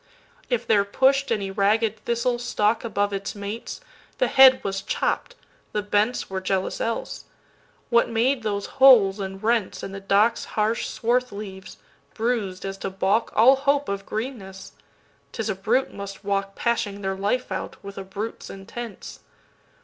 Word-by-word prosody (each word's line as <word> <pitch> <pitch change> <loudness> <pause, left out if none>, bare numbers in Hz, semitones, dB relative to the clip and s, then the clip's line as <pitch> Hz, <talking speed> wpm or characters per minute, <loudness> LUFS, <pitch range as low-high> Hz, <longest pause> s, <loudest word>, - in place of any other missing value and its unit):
If 240 -2 0
there 205 -2 +4
push'd 265 +6 +2
any 200 -4 -1
ragged 210 +2 +1
thistle=stalkAbove 230 -3 0
its 195 +1 -4
mates, 205 - -6 0.4
the - - +1
head 260 -1 +8
was 195 0 -2
chopp'd; - - -2 0.4
the 210 - -1
bentsWere 205 -2 0
jealous 190 0 -1
else. 230 0 -3 0.7
What 235 0 +4
made 240 +3 +1
those 205 -2 -2 0.2
holes 215 -7 +7
and 195 -1 -5
rentsIn 220 -3 -1
the 195 - -6
dock's 205 +4 +2
harsh 220 +2 +1
swarth 250 +2 0
leaves, 195 -2 -8 0.4
bruis'd 215 -6 -2
as 195 0 -5
to - - -3
baulkAll 220 +6 +3
hope 285 +1 +1
of 200 0 -4
greenness? 210 -5 -6 0.6
'T - - -3
is 220 - -3
a - - 0
brute 225 +7 0
must 200 0 -8
walkPashing 200 +1 -1
their 195 0 -1
life 205 +5 -1
out, 190 - -4
with 200 0 -8
a - - -5
brute's 200 +4 -6
intents. 200 +3 -8
210 Hz, 140 wpm, -24 LUFS, 195-235 Hz, 0.7 s, head